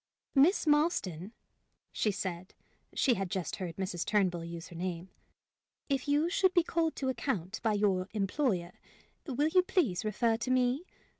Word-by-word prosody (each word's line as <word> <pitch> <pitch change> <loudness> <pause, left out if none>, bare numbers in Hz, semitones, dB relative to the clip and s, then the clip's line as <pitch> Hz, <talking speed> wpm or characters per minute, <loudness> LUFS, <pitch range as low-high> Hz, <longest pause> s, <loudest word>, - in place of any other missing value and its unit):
"Miss 305 +9 +4
Marston," 295 - +1 0.6
she 215 - 0
said 185 -2 -4 0.4
she 255 - +3
had 195 -4 -2
just 185 -2 -3
heard 175 -3 -5
Mrs. 185 -2 -3
Turnbull 185 -5 +1
use 170 0 -7
her 175 - -11
name 175 +1 -4 0.8
"if 275 -1 0
you 295 +3 +3
should 375 +1 +2
be 350 - +5
called 325 -1 0
to 265 - -2
account 225 -6 -2
by 225 -2 +1
your 195 -3 +1
employer, 195 - 0 0.6
will 290 +3 +1
you, 365 +3 +5
please, 320 - 0
refer 225 +2 +1
to 255 - -4
me? 255 +6 +1
215 Hz, 155 wpm, -31 LUFS, 185-285 Hz, 0.8 s, be